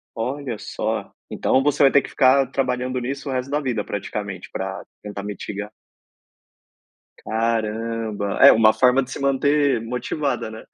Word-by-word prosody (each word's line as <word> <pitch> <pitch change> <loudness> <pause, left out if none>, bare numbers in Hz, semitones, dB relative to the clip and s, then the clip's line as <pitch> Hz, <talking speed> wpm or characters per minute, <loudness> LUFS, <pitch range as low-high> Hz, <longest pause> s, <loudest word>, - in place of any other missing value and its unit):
Olha 125 0 -3
só. - - -3 0.2
Então, 130 +1 +1
você 145 -1 +2
vai 135 - +6
ter 140 - +5
que - - -9
ficar 135 +1 +4
trabalhando 125 -1 -1
nisso 135 +3 -4
o - - -2
resto 130 +1 -2
da 150 +1 0
vida, 120 -7 -1
praticamente, 100 -1 -5
pra - - -4 0.2
tentar 100 -1 -7
mitigar? 105 +1 -6 1.5
Caramba. 110 -2 -2
É, - - +11
uma 110 -1 +5
forma 130 +1 +4
de 130 - -11
se - - -5
manter 140 -2 +2
motivada, 125 +1 -2
né? 110 0 -9
125 Hz, 150 wpm, -22 LUFS, 110-135 Hz, 1.5 s, É